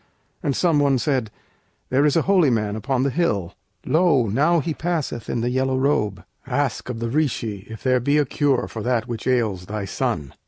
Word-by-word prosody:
And 140 - -1
some 165 -5 +2
one 140 -2 +3
said, 130 -4 0 0.6
'There 140 +3 +4
is 145 - +1
a 165 - +3
holy 185 -6 +4
man 105 -3 0
upon 130 +3 -1
the 140 - +1
hill 105 - 0 0.3
Lo! 155 -3 +3
now 145 - +2
he 160 +1 -2
passeth 155 -8 -3
in 120 - -1
the 120 +1 0
yellow 130 +1 0
robe; 110 -8 0 0.2
Ask 135 -1 -1
of 125 - -3
the 115 0 -3
Rishi 115 -9 -1
if 110 -1 -9
there 130 -1 +3
be 140 +5 +2
a 150 - +3
cure 140 0 +1
For 110 - -6
that 120 0 0
which 115 -1 -5
ails 110 -8 0
thy 105 -1 -4
son.' 70 -7 -2
130 Hz, 200 wpm, -22 LUFS, 110-145 Hz, 0.6 s, There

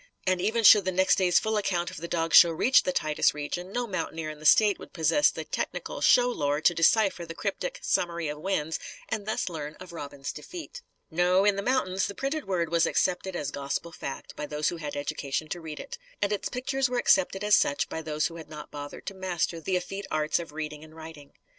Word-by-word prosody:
And, 185 -1 +1
even 225 +4 +1
should 205 -2 +8
the 185 - +1
next 190 +2 +3
day's 180 -2 +4
full 220 0 +1
account 175 -4 -1
of - - -10
the 170 - -6
dog 165 -2 -1
show 170 - +9
reach 220 +11 +4
the 185 - -1
Titus 155 -4 +1
region, 175 +5 -5
no 245 +3 -1
mountaineer 165 -7 -4
in 155 - -11
the 155 - 0
State 210 +4 +5
would - - -12
possess 165 - +3
the - - -6
technical - - -4
show 245 -1 +5
lore 145 -11 0
to 170 +2 +4
decipher 185 +2 +3
the 165 0 -8
cryptic - - -3
"summary 170 -2 0
of 150 0 -5
wins" 160 -3 -1 0.3
and 215 -2 -3
thus 220 - -1
learn 155 -3 -5
of 180 -1 -12
Robin's 140 -3 -6
defeat. 360 +8 -9 0.3
No: 180 +3 +3
in 205 -1 +4
the 200 - -2
mountains, 200 -6 0
the 200 - -7
printed 280 +3 -3
word 175 -4 0
was 170 -1 +3
accepted 185 +1 0
as 145 -4 -3
gospel 140 +5 -4
fact 135 -4 -7
by 150 - -5
those 150 0 0
who 175 - -5
had 150 -3 -6
education 145 +1 -3
to 175 - -4
read 155 -2 -7
it. - - -8 0.2
And 205 0 0
its 205 - -2
pictures 265 +1 -1
were 250 - -1
accepted 195 -3 +2
as 210 0 +5
such 140 - +1
by 160 - -5
those 155 -1 -1
who 170 - -3
had 160 -2 -10
not 150 -1 -9
bothered 145 0 -8
to 195 - -4
master 180 -3 -2
the 185 +3 -1
effete 195 +2 -6
arts 155 +1 0
of 170 -3 -7
reading 150 0 -6
and 155 0 -15
writing. 160 -3 -11
175 Hz, 230 wpm, -27 LUFS, 155-200 Hz, 0.3 s, show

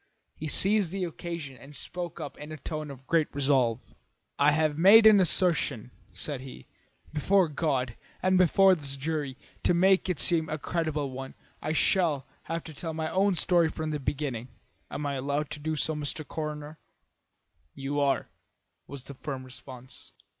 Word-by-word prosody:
He 155 - -5
seized 195 +4 +3
the 190 +1 -3
occasion 170 -5 -5
and 140 +5 -13
spoke 175 +4 -5
up 150 -3 -6
in 150 +1 -8
a 155 - -6
tone 155 +2 -5
of 135 -1 -11
great 160 +1 +2
resolve. 135 -5 +2 0.6
"I 145 +1 +6
have 155 0 +1
made 200 +7 +8
an 215 -2 +8
assertion," 170 - +2 0.2
said 145 -4 -3
he, 130 -1 -10 0.5
"before 185 +4 +3
God 135 -6 -1 0.3
and 185 0 +3
before 185 +2 +5
this 140 -5 -2
jury. 145 -2 -3 0.2
To 175 - +2
make 190 +2 +4
it 180 - -1
seem 165 -3 +3
a 155 - -2
credible 155 -2 -2
one 135 +1 -7 0.3
I 155 - -1
shall 160 -5 +2 0.2
have 165 0 -3
to 160 - -10
tell 160 +1 -5
my 160 0 -2
own 195 0 +2
story 170 -1 +3
from 155 0 -4
the 150 - -2
beginning. 135 -4 -3 0.4
Am 145 - -4
I 140 - -1
allowed 140 +3 -2
to 150 - -5
do 155 +1 -2
so, 155 +2 +1
Mr. 150 0 -3
Coroner?" 150 0 -5 1.0
"You 140 +1 -3
are," 140 -1 +1 0.6
was 140 -3 -8
the 140 - -8
firm 135 -1 -6
response. 130 0 -10
150 Hz, 170 wpm, -28 LUFS, 140-170 Hz, 1.0 s, made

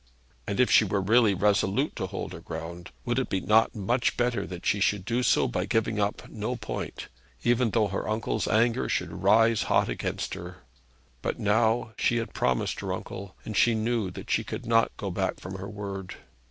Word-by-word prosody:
And 100 - -2
if 125 - +4
she - - +7
were 100 0 0
really 105 +1 +4
resolute 105 - +1
to 95 - -2
hold 95 +1 -5
her - - -7
ground, 85 +2 -7 0.2
would 120 +1 +1
it 130 - -3
not 110 +3 +5
be 110 - -8
much 120 +5 +1
better 120 -1 0
that 90 -1 -8
she 105 - +2
should 100 -1 +1
do 120 +2 0
so - - +3
by - - -1
giving 115 -2 0
up 105 0 -1
no 110 +3 -3
point, 110 -3 -5 0.4
even 120 0 +3
though 110 0 +2
her 100 +2 -3
uncle's 110 -2 -1
anger 115 +2 +2
should - - -2
rise 115 0 +4
hot - - +3
against - - -3
her? 90 +1 -8 0.6
But - - -2
now 110 +2 +2
she 120 - +2
had 115 - -3
promised 65 -1 0
her - - -3
uncle, 100 -1 -6
and 110 - -5
she 115 +1 +4
knew 110 -2 0
that 90 - -8
she - - +2
could - - -6
not 115 0 +3
go 100 -2 -4
back 95 +1 -1
from 95 +1 -7
her 100 - -6
word. 100 -2 -6
110 Hz, 200 wpm, -27 LUFS, 95-115 Hz, 0.6 s, she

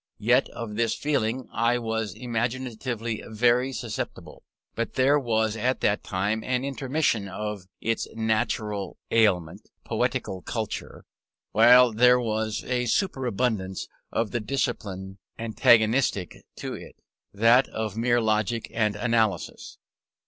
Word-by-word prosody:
Yet 125 +5 +3
of 110 -2 -7
this 115 -1 +1
feeling 130 -4 -1
I 115 +1 +2
was 110 -4 -3
imaginatively 120 -1 -3
very 120 +4 +2
susceptible; 120 -4 -6 0.3
but 115 - -3
there 140 +3 +4
was 110 -4 0
at 125 +4 0
that 100 - +1
time 105 +4 -1
an 130 +1 -1
intermission 135 -5 0
of 105 -1 -5
its 115 0 -1
natural 110 -2 -1
aliment, 95 -8 +1
poetical 95 -1 -2
culture, 110 +1 -5 0.5
while 120 +3 +7
there 125 +3 +5
was 110 -2 -2
a 125 -1 -1
superabundance 120 - -1 0.2
of 115 -2 -1
the 120 - -1
discipline 100 -6 -3 0.2
antagonistic 115 -2 +2
to - - -5
it, - - -10 0.4
that 115 +5 +4
of 110 -2 -4
mere 120 +1 +2
logic 110 +1 0
and 105 -2 +1
analysis. 115 -4 -1
115 Hz, 120 wpm, -26 LUFS, 105-125 Hz, 0.5 s, while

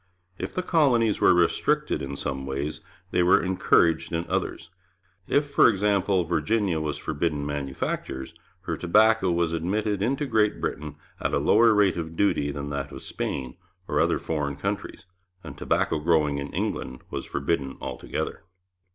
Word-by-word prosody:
If - - -5
the 185 - -1
colonies 125 - +2
were - - +6
restricted 85 -1 +1
in 70 0 -5
some 65 -2 -4
ways, 70 +3 -3 0.3
they - - +2
were 90 +1 +5
encouraged 85 -2 +2
in 85 0 -2
others. - - -3 0.6
If, 145 0 +1
for 140 - +6
example, 100 -2 +1
Virginia 85 +2 0
was 75 -1 -2
forbidden 75 -1 -2
manufactures, 70 0 -4 0.3
her 85 -3 -3
tobacco 105 +4 +3
was 85 -1 0
admitted 100 +5 -1
into 135 +7 0
Great 110 -5 +1
Britain 75 0 -4 0.2
at - - -1
a - - +3
lower 115 0 +5
rate 100 -4 +3
of 80 -1 -5
duty 80 -6 +1
than 70 0 -5
that 70 -1 -4
of - - -9
Spain 65 -2 -4 0.3
or - - 0
other - - +2
foreign 75 -3 -2
countries, 100 +5 -4 0.4
and - - -8
tobacco 80 - 0
growing 75 -3 +2
in 70 0 -5
England 65 0 -3
was - - -4
forbidden 70 -1 -2
altogether. - - -4
85 Hz, 155 wpm, -26 LUFS, 75-105 Hz, 0.6 s, were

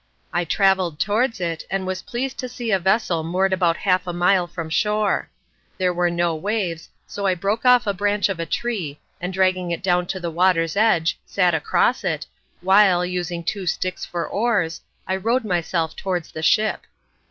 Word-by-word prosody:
I 175 0 0
travelled 190 -3 +2
towards 225 +2 +1
it, 165 -3 -3
and 195 -1 -2
was 185 0 -3
pleased 255 +2 -4
to 255 - -4
see 240 -2 -4
a 195 - +3
vessel 185 -2 +1
moored 185 +4 +1
about 170 -2 +2
half 185 -1 +1
a - - -1
mile 180 +1 +2
from 165 -2 -6
shore. 210 +5 0 0.5
There 185 -1 +1
were 175 0 +1
no 170 0 0
waves, 180 -2 -2 0.2
so 200 -1 -3
I 185 - +2
broke 200 +7 -2
off 250 -1 +6
the 205 - -1
branch 205 +2 +1
of 195 -4 -4
a 165 - -3
tree, 180 -10 -3 0.2
and 180 +1 -3
dragging 185 -1 +1
it 170 +1 -3
down 180 -1 +1
to 185 - -3
the 170 -2 -4
water's 165 -1 +2
edge, 200 -6 +2
sat 180 -3 +2
across 160 - +1
it, - - -2 0.4
while, 190 -1 +5
using 175 -1 -3
two 190 +2 -3
sticks 185 +2 -2
for 170 -1 -3
oars, 200 -7 0 0.2
I 190 +1 -1
rowed 230 +5 0
myself 170 -3 -1
towards 180 -4 -3
the 160 - -6
ship. 215 +7 +2
185 Hz, 185 wpm, -22 LUFS, 170-205 Hz, 0.5 s, off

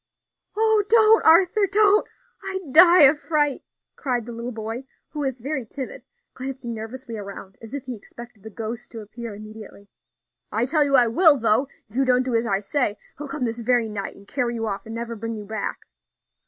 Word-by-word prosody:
"Oh! 440 -1 +3
don't, 445 -1 +5
Arthur, 365 +5 +5
don't; 420 0 +4 0.3
I'd 380 -8 -6
die 350 0 +8
of 290 +2 +6
fright," 295 -3 0 0.3
cried 245 -5 -2
the 240 - -8
little 235 +1 -6
boy, 225 +3 -6 0.2
who 300 - -7
was 265 -3 -2
very 275 +1 -3
timid, 260 +4 -8 0.3
glancing 260 -2 -6
nervously 230 +1 -7
around, 200 -1 -9
as 225 +4 -8
if 280 - -5
he 250 -1 -6
expected 235 +1 -13
the 220 - -9
ghost 225 +2 -7
to 225 - -7
appear 225 +1 -8
immediately. 215 -1 -12 0.6
"I 225 +3 0
tell 300 +3 +3
you 280 -1 +2
I 250 -2 +6
will, 290 +6 +5
though, 230 +3 +2 0.2
if 215 - -20
you 270 - +2
don't 255 -1 +3
do 255 -1 -3
as 230 0 +1
I 195 -2 0
say; 210 -1 -1 0.2
he'll 295 - -6
come 275 -2 -3
this 230 0 -3
very 235 -1 +1
night 205 -2 -5
and 200 - -17
carry 240 0 -2
you 225 -1 -3
off, 200 0 -4
and 225 - -7
never 235 0 -5
bring 230 +1 -5
you 210 -1 -8
back." 220 +2 -4
245 Hz, 200 wpm, -23 LUFS, 220-285 Hz, 0.6 s, die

